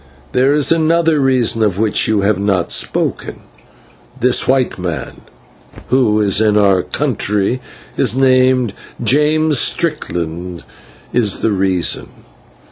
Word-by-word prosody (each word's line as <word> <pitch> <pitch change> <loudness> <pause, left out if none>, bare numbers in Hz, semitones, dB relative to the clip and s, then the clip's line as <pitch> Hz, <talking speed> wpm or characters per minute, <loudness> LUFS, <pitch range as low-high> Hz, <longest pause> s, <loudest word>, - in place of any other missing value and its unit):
There 135 +3 +2
is 150 0 +2
another 165 -1 +2
reason 130 -4 +1
of 105 -4 0
which 110 -1 +1
you 110 -2 +1
have 100 -1 0
not 100 -3 -1
spoken. - - -1 0.8
This 125 0 +2
white 130 -6 0
man, 90 -3 -6 0.7
who 120 -4 +2
in 105 - +1
his 100 0 +1
own 105 -3 +3
country 105 0 -1 0.4
is 115 - +2
named 130 -3 +2 0.3
James 150 +3 +2
Strickland, 90 - -2 0.5
is 110 -5 +1
the 110 - 0
reason. 95 -3 0
115 Hz, 120 wpm, -15 LUFS, 100-135 Hz, 0.8 s, own